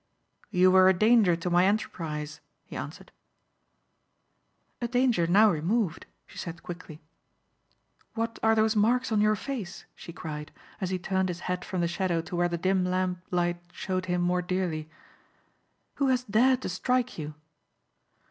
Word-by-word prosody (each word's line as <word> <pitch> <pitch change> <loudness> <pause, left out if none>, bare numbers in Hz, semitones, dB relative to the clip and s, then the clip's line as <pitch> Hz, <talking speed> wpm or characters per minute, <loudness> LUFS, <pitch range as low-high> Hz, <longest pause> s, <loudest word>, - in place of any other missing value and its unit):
"You 185 -2 +4
were 185 0 +7
a 190 - +4
danger 215 -2 +4
to 170 +2 -3
my 175 +1 +5
enterprise," 155 -7 -3 0.2
he - - -10
answered. - - -7 1.7
"A 240 - 0
danger 245 -8 +2
now 205 +5 +6
removed," 175 +2 -1 0.2
she - - -12
said 170 0 -7
quickly. 170 -3 -9 1.1
"What 230 0 -3
are 220 0 +4
those 220 0 +2
marks 235 +4 +2
on 215 -1 +3
your 215 0 +3
face?" 230 -6 -6
she - - -10
cried 150 -3 -7 0.3
as 185 - -1
he 185 - -1
turned 190 +1 -1
his 170 -1 -5
head 180 0 -3
from 185 -2 -3
the 170 - +1
shadow 175 -1 -1
to 165 +2 -5
where 175 0 +2
the 170 - -2
dim 185 +2 +1
lamp 180 0 -1
light 175 -1 0
showed 185 0 -3
him 180 0 0
more 180 +1 +1
dearly. 175 -4 -2 1.1
"Who 280 - +2
has 255 -1 +2
dared 250 +3 +3
to - - -2
strike 250 +4 -1
you?" 150 0 -6
185 Hz, 160 wpm, -28 LUFS, 175-215 Hz, 1.7 s, were